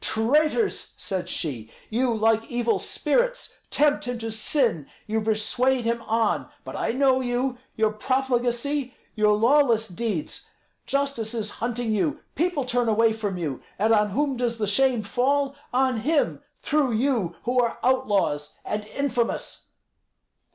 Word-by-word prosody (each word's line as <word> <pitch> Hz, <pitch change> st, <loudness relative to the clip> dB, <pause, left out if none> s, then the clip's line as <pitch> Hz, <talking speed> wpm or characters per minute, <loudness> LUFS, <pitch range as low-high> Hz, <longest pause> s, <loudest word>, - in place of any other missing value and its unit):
"Traitors!" 300 Hz, -, +1 dB
said 185 Hz, -2 st, -3 dB
she, 120 Hz, -9 st, -3 dB, 0.2 s
"you, 245 Hz, +3 st, +1 dB
like 225 Hz, 0 st, +2 dB
evil 240 Hz, -1 st, +1 dB
spirits, -, -, -1 dB, 0.2 s
tempt 295 Hz, 0 st, +2 dB
him 245 Hz, 0 st, -3 dB
to 225 Hz, -1 st, -4 dB
sin; 220 Hz, -, 0 dB, 0.2 s
you 220 Hz, 0 st, -1 dB
persuade 230 Hz, +4 st, +1 dB
him 235 Hz, 0 st, 0 dB
on. 225 Hz, -1 st, +1 dB
But -, -, -8 dB
I -, -, -1 dB
know 260 Hz, +1 st, +3 dB
you, 245 Hz, 0 st, -1 dB, 0.2 s
your 220 Hz, -1 st, +2 dB
profligacy, 255 Hz, +3 st, -1 dB, 0.2 s
your 210 Hz, -1 st, +3 dB
lawless 235 Hz, -2 st, +4 dB
deeds. 195 Hz, -4 st, -4 dB, 0.4 s
Justice 275 Hz, -5 st, -1 dB
is 215 Hz, -2 st, -3 dB
hunting 235 Hz, -1 st, -1 dB
you; 290 Hz, +9 st, 0 dB
people 325 Hz, -4 st, 0 dB
turn 245 Hz, -2 st, +1 dB
away 225 Hz, +1 st, +3 dB
from 205 Hz, -4 st, -3 dB
you, 150 Hz, -7 st, -3 dB, 0.2 s
and 220 Hz, +3 st, +3 dB
on 210 Hz, -1 st, +3 dB
whom 275 Hz, +6 st, 0 dB
does 240 Hz, -1 st, -1 dB
the 215 Hz, -, 0 dB
shame 240 Hz, +2 st, +2 dB
fall? 275 Hz, +5 st, +1 dB, 0.2 s
On 255 Hz, -1 st, +2 dB
him, 290 Hz, +7 st, +1 dB, 0.2 s
through 290 Hz, -5 st, +1 dB
you 230 Hz, -6 st, 0 dB
who 250 Hz, +2 st, +1 dB
are 235 Hz, -2 st, +1 dB
outlaws, 205 Hz, -, +1 dB
and 210 Hz, 0 st, -3 dB
infamous." 245 Hz, -1 st, -2 dB
235 Hz, 145 wpm, -25 LUFS, 220-265 Hz, 0.4 s, lawless